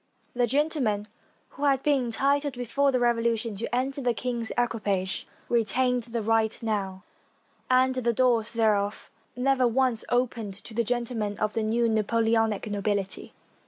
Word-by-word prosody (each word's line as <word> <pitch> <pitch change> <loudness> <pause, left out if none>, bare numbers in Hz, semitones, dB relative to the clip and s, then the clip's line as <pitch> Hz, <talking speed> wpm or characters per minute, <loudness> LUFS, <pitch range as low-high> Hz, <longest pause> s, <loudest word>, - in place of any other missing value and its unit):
The 245 0 +1
gentlemen 260 -6 0 0.4
who 290 - -4
had 270 -2 +2
been 280 -4 +2
entitled 280 +4 +1
before 275 +3 +1
the 255 - +1
Revolution 230 -2 +1
to 235 +3 -2
enter 270 +3 -1
the 245 -2 +1
king's 240 -1 -3
equipage, 200 -6 -1 0.2
retained 245 +2 +1
the 230 -1 -3
right 225 0 +1
now, 195 -4 -2 0.7
and 255 0 +4
the 245 -2 0
doors 235 -2 +2
thereof 210 -3 0 0.2
never 255 0 +2
once 245 -1 +1
opened 235 -5 -1
to 230 - -11
the 235 +2 +1
gentlemen 230 -3 -2
of 215 -1 -1
the 225 - 0
new 230 +2 +1
Napoleonic 225 -1 +1
nobility. 200 -2 -2
235 Hz, 145 wpm, -27 LUFS, 215-255 Hz, 0.7 s, and